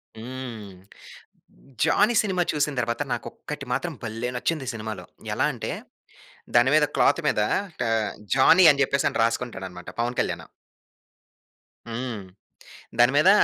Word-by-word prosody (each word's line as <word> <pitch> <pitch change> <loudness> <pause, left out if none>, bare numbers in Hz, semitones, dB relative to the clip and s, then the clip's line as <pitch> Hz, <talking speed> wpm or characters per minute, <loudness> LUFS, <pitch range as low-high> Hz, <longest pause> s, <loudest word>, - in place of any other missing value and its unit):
హ్మ్. 115 -4 -7 1.1
Johnny 215 +4 +4
cinema 185 -4 0
చూసిన 150 -1 0
తరువాత 120 +2 -1
నాకు - - -4
ఒక్కటి 150 -2 -7
మాత్రం 155 +6 -1
భలే 115 +2 -3
నచ్చింది 140 +2 -1
సినిమాలో. 110 -4 -6 0.3
ఎలా - - +1
అంటే - - -4 0.8
దాని 120 +2 +6
మీద 150 -1 +5
క్లాత్ - - +3
మీద - - +2 0.5
ఆహ్, 110 -1 +1 0.2
జానీ 170 +7 +7
అని 140 0 -1
చెప్పేసని 140 -3 0
రాసుకుంటాడనమాట 95 -7 -3
పవన్ 120 +1 -2
కళ్యాణు. - - -1 1.4
హ్మ్. 115 -3 -4 0.8
దాని 120 +2 +6
మీద 175 +6 +6
125 Hz, 120 wpm, -25 LUFS, 115-145 Hz, 1.4 s, జానీ